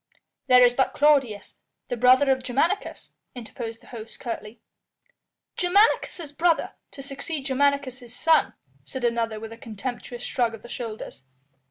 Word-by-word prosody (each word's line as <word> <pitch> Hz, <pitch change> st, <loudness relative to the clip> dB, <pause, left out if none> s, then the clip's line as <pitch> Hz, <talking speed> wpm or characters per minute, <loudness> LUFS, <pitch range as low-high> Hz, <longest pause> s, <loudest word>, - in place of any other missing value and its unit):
"There 250 Hz, 0 st, +7 dB
is 245 Hz, 0 st, +5 dB
but 265 Hz, +1 st, +1 dB
Claudius, 275 Hz, -8 st, +2 dB, 0.3 s
the -, -, -1 dB
brother 255 Hz, +3 st, +5 dB
of 260 Hz, 0 st, +1 dB
Germanicus," 280 Hz, +11 st, -1 dB, 0.2 s
interposed 230 Hz, -1 st, -7 dB
the -, -, -19 dB
host 225 Hz, -1 st, -9 dB
curtly. 230 Hz, -2 st, -6 dB, 1.0 s
"Germanicus' 355 Hz, -4 st, +2 dB
brother 330 Hz, +2 st, +1 dB, 0.2 s
to 275 Hz, -, -10 dB
succeed 275 Hz, +1 st, -6 dB
Germanicus' 265 Hz, -3 st, 0 dB
son," 325 Hz, +4 st, +3 dB, 0.3 s
said 260 Hz, -2 st, -5 dB
another 230 Hz, -2 st, 0 dB
with 225 Hz, 0 st, -8 dB
a -, -, -12 dB
contemptuous 240 Hz, +2 st, -6 dB
shrug 235 Hz, -3 st, 0 dB
of 225 Hz, -, -16 dB
the 240 Hz, -, -11 dB
shoulders. 220 Hz, -, -7 dB
250 Hz, 140 wpm, -25 LUFS, 230-280 Hz, 1.0 s, There